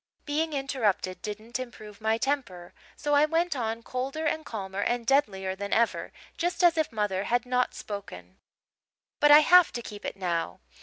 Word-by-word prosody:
"Being 310 +2 -1
interrupted 240 -9 -1
didn't 215 +4 -5
improve 215 -4 -9
my 220 +1 +1
temper, 230 -10 -3 0.2
so 295 - -1
I 290 +1 +6
went 330 +1 0
on, 230 -2 -3
colder 270 +6 -3
and 315 +1 0
calmer 195 -5 -5
and 240 +1 -1
deadlier 195 -8 +1
than 200 +1 -6
ever, 235 +1 +1 0.3
just 360 +1 -1
as 345 -1 +6
if 315 -4 0
mother 205 -3 -1
had 245 +1 +1
not 250 0 0
spoken. 95 - -8 0.4
"' - - -67
but 295 - +6
I 295 +1 +10
have 355 +2 +6
to 240 - -4
keep 205 -2 -9
it - - -4
now. 170 - -2
235 Hz, 175 wpm, -27 LUFS, 200-290 Hz, 0.4 s, I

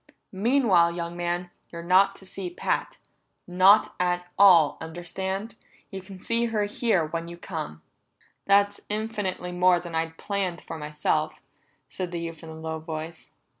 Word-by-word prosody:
"Meanwhile, 195 -6 +3
young 170 0 -4
man, 175 0 -2 0.2
you're 170 0 -8
not 190 +3 +4
to 195 - -14
see 185 -1 -5
Pat. 175 - -2 0.5
Not 185 +4 +5
at 180 0 0
all 180 -7 +6
understand? 190 +6 -4 0.4
You 190 -1 -6
can 190 0 -12
see 230 +4 0
her 220 -3 0
here 205 -4 +1
when 165 +2 -4
you 170 0 -9
come." 155 - -6 0.6
"That's 200 +1 +3
infinitely 210 -4 -3
more 180 0 +4
than 175 -1 -8
I'd 165 0 -2
planned 195 -4 -2
for 165 - -7
myself," 150 +1 -1 0.5
said 185 -2 -5
the 170 - -3
youth 165 -1 -6
in 165 - -10
a 160 - -8
low 160 0 -5
voice. 160 +1 -7
180 Hz, 155 wpm, -26 LUFS, 165-195 Hz, 0.6 s, all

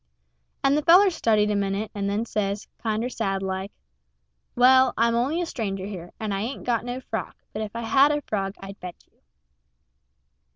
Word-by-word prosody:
And 275 +1 +4
the 300 - +2
feller 365 +5 +6
studied 215 -8 +2
a - - 0
minute, 200 +1 -1
and 200 -1 -2
then 210 +3 -1
says, 205 -2 -2
kinder 220 +1 -1
sad 195 -5 -2
like, 190 +1 -3 0.8
"Well, 260 +1 +5
I'm 230 +1 +3
only 270 +9 0
a - - -1
stranger 195 - -4
here, 180 -4 -7
and 215 -2 -2
I 195 - -2
ain't 245 +6 -4
got 235 -2 0
no 245 +1 -4
frog; - - -5 0.2
but 215 - -4
if 215 +1 -6
I 235 - -3
had 270 +5 +4
a 295 -1 -1
frog 195 -1 -3
I'd 195 +1 -10
bet 180 -1 -7
you." - - -39
220 Hz, 190 wpm, -25 LUFS, 200-250 Hz, 0.8 s, feller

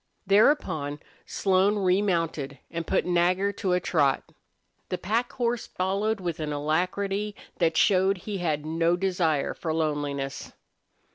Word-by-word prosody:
Thereupon 185 - +2 0.3
Slone 195 +1 +2
remounted 175 -7 0
and 170 -1 -4
put 190 - +1
Nagger 180 +3 +2
to 190 -2 -1
a 180 - +3
trot. 145 -6 +1 0.7
The 180 - -1
pack 230 +6 -1
horse 240 -1 -1
followed 200 +4 -1
with 175 -3 -4
an 155 -1 -3
alacrity 195 +7 -1 0.2
that 165 -2 +2
showed 190 0 +4
he 200 +2 -5
had 155 -4 -1
no 165 +2 +1
desire 175 -6 0
for 160 - -4
loneliness. 145 -3 -2
180 Hz, 130 wpm, -26 LUFS, 155-195 Hz, 0.7 s, showed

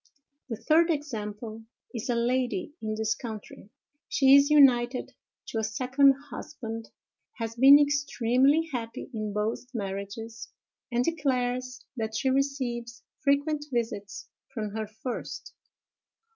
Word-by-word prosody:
The 230 - -2
third 325 +8 +3
example 225 -7 -4 0.3
is 235 +1 -5
a 240 - +2
lady 255 +7 0
in 215 -1 -2
this 220 0 0
country. 220 -4 -9 0.4
She 270 -1 +5
is 280 +1 +6
united 255 -4 +4 0.4
to 225 - -2
a - - -1
second 260 +5 +3 0.2
husband, 225 -7 -7 0.4
has 225 -1 -4
been 270 +4 +9
extremely 285 +1 +2
happy 230 -1 -5
in 215 -2 -3
both 210 +4 -2
marriages, 205 +3 -5 0.4
and 240 +1 +2
declares 255 -5 -1
that 220 -1 -3
she 260 +5 +1
receives 250 -4 -2 0.2
frequent 290 +1 +1
visits 225 -5 -3 0.2
from 215 -4 -4
her 220 0 -4
first. 220 +4 -6
240 Hz, 120 wpm, -28 LUFS, 220-275 Hz, 0.4 s, been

